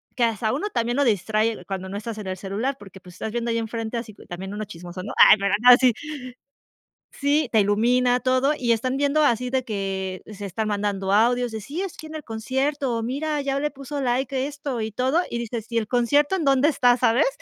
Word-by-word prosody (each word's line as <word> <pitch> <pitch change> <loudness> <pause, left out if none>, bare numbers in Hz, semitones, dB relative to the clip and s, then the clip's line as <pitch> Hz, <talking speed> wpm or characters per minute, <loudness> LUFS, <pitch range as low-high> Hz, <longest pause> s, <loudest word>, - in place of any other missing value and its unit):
que 245 - +1
hasta 220 -1 -1
uno, 320 +10 -2
también 240 - -1
lo 285 - +3
distrae, 215 +1 0
cuando 190 -1 -5
no 200 - -4
estás 220 +1 -6
en 205 - -7
el 185 0 -3
celular, 210 +8 -3
porque, 195 -1 -13
pues, 180 -1 -14
estás 220 - -5
viendo 235 +1 -2
ahí 230 - 0
en 225 - -3
frente, 230 0 -4
así 230 -2 -6 0.2
también 190 +3 -6
uno 210 +1 -4
chismoso, 180 -1 -9
¿no? 210 - -6
Ay, - - +9
pero 200 0 +1
no, 250 - +7
así. 250 0 +6 1.2
Sí, 285 -1 +1
te 220 - +5
ilumina 245 +5 +3
todo, 260 +3 +2
y 240 -2 +2
están 255 +4 0
viendo 285 +2 +2
así 250 -1 +1
de 260 -1 0
que 195 -4 -3
se 205 0 -7
están 215 +4 -3
mandando 200 -2 -1
audios 245 +3 +3
de: 220 - -4
"Sí, 285 - -6
es 390 -3 -6
que 315 - -9
en 315 - -7
el 305 - -8
concierto", 265 +3 -1
o: 230 - -2
"Mira, 290 +5 -2
ya 275 0 -1
le 295 - -1
puso 280 +1 -6
like, 265 +2 -1
a - - +1
esto 280 -2 -4
y 220 0 -2
todo", 260 - +1
y 235 - -2
dices: 235 -1 -4
"¿Y 230 - +2
el 220 - -1
concierto 285 - +2
en 330 - -2
dónde 275 +1 +4
está?", 245 -5 +4
¿sabes? 230 +2 +3
235 Hz, 235 wpm, -24 LUFS, 210-270 Hz, 1.2 s, Ay